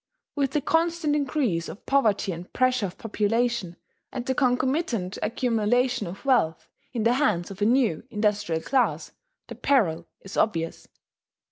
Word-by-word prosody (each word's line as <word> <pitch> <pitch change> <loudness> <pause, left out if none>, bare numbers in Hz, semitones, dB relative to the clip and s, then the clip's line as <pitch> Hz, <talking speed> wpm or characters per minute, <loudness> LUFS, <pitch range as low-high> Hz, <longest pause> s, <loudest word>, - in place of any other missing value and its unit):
With 275 -2 0
the 300 - +1
constant 325 0 +1
increase 260 - 0
of - - -10
poverty 220 -7 +2
and 175 +1 -8
pressure 255 -4 +2
of 180 - -11
population, 225 -3 -1 0.4
and 250 -2 -5
the 260 - 0
concomitant 250 - 0
accumulation 240 -1 +1
of 190 +9 -9
wealth 230 - +2 0.2
in 235 -4 -2
the 235 +2 +4
hands 245 -11 +1
of 195 +1 -10
a - - +4
new 230 - +2
industrial 210 -7 0
class, 260 -2 0 0.3
the - - -8
peril 170 - +1
is 195 - -9
obvious. 165 -7 0
230 Hz, 145 wpm, -26 LUFS, 195-260 Hz, 0.4 s, the